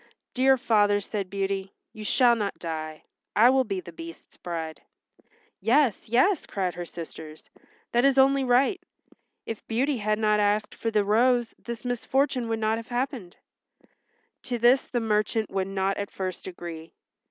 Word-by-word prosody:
"Dear 265 +1 +4
father," 210 -5 +3
said 200 -1 -4
Beauty, 195 0 -3 0.2
"you 215 -2 -8
shall 240 +2 +4
not 205 -3 -3
die. 155 -2 -5 0.3
I 235 +4 +7
will 265 0 +3
be 195 -4 -2
the 170 - -11
Beast's 165 0 -11
bride." 165 -2 -6 0.8
"Yes, 245 -2 +2
yes," 275 - +3
cried 185 -3 -2
her 175 -1 -6
sisters. 160 -2 -10 0.4
"That 240 +1 +2
is 275 -1 +4
only 270 0 +5
right. 260 +9 +2 0.6
If 225 - -7
Beauty 255 +3 0
had 215 0 0
not 210 -1 +2
asked 210 +1 +1
for 225 - -3
the 215 -2 +2
rose 240 +3 +2
this 235 +1 -7
misfortune 250 0 0
would 225 - 0
not 220 0 0
have 230 - -10
happened." 245 -6 -3 1.0
To 245 - -3
this 240 +3 +4
the 245 - -1
merchant 215 0 0
would 190 -1 -1
not 195 0 -1
at 200 -1 -3
first 185 -1 -5
agree. 170 -3 -8
215 Hz, 160 wpm, -26 LUFS, 190-245 Hz, 1.0 s, I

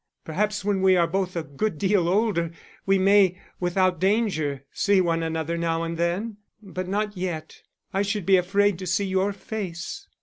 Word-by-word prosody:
Perhaps 210 +5 -1
when 200 -2 +1
we 190 -1 +5
are 170 - +4
both 185 +1 -2
a 170 - -1
good 155 +6 -3
deal 190 -1 +2
older 190 -4 +1 0.4
we 195 0 +4
may, 190 -1 +4 0.2
without 180 0 +1
danger, 185 - 0
see 200 -2 +2
one 165 -2 +1
another 160 +1 -2
now 165 0 0
and 165 0 -3
then; 180 +6 -1 0.2
but 185 -3 -6
not 205 +2 -1
yet. 175 -4 -5 0.3
I 195 - +1
should 205 -2 -1
be 195 - +5
afraid 195 +1 +2
to 185 - -5
see 180 +4 +1
your 190 +1 +1
face. 195 -4 -6
185 Hz, 175 wpm, -25 LUFS, 170-200 Hz, 0.4 s, we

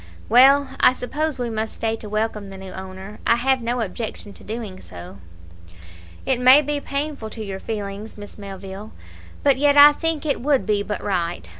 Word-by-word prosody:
"Well, 270 +4 +6
I - - +6
suppose 295 +4 -3
we 245 -2 -3
must 220 0 -3
stay 225 0 -1
to 215 - -9
welcome 215 -1 -2
the 195 - -9
new 190 0 -9
owner; 190 +2 -9
I - - +5
have 260 +2 +1
no 240 +1 -1
objection 210 0 -5
to - - -15
doing 215 -4 -6
so." 90 +2 -11 1.1
"It 260 -2 +1
may 260 +4 +7
be 295 0 -2
painful 280 -5 -4
to 220 0 -7
your 195 -1 -5
feelings, 205 0 -6
Miss 205 +1 -10
Melville, 195 +1 -9 0.5
but 280 -2 +4
yet 290 +1 +3
I 290 +1 +10
think 320 0 -2
it 285 -5 -1
would 275 0 +1
be 210 -2 +1
but 210 +1 -4
right. 175 - -2
220 Hz, 185 wpm, -22 LUFS, 200-270 Hz, 1.1 s, I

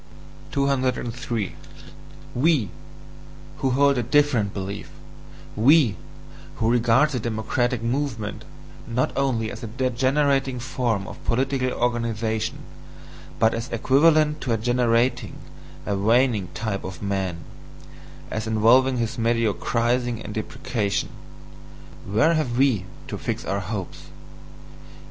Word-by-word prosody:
203. 125 -5 -1 0.8
We, 135 - +2 0.9
who 135 - 0
hold 140 +1 +3
a - - +2
different 125 -4 +2
belief 100 +1 -5 0.7
we, 125 - +5 0.6
who 115 +1 +1
regard 120 +5 +3
the 125 - -1
democratic 115 +2 -1
movement, 115 -4 -2 0.4
not 120 +1 0
only 120 -5 0
as 120 - -8
a 115 - -5
degenerating 130 +2 +1
form 120 -5 -1
of - - -10
political 130 +1 0
organization, 115 -3 -1 0.7
but 110 0 +3
as 115 +3 -4
equivalent 150 +5 +3
to 125 - -2
a - - +1
degenerating, 120 +1 +1 0.5
a 100 - -1
waning 110 0 +2
type 110 -3 -3
of 95 -2 -7
man, 95 -3 -1 0.9
as 110 +1 -3
involving 120 +4 +4
his 120 +2 -2
mediocrising 115 +1 0
and 105 - -6
depreciation: 110 -1 -2 1.0
where 110 +12 +3
have 130 -7 0
WE 125 -9 +3 0.2
to - - -5
fix - - -3
our 100 - -1
hopes? 95 -6 -6
120 Hz, 110 wpm, -24 LUFS, 110-130 Hz, 1.0 s, we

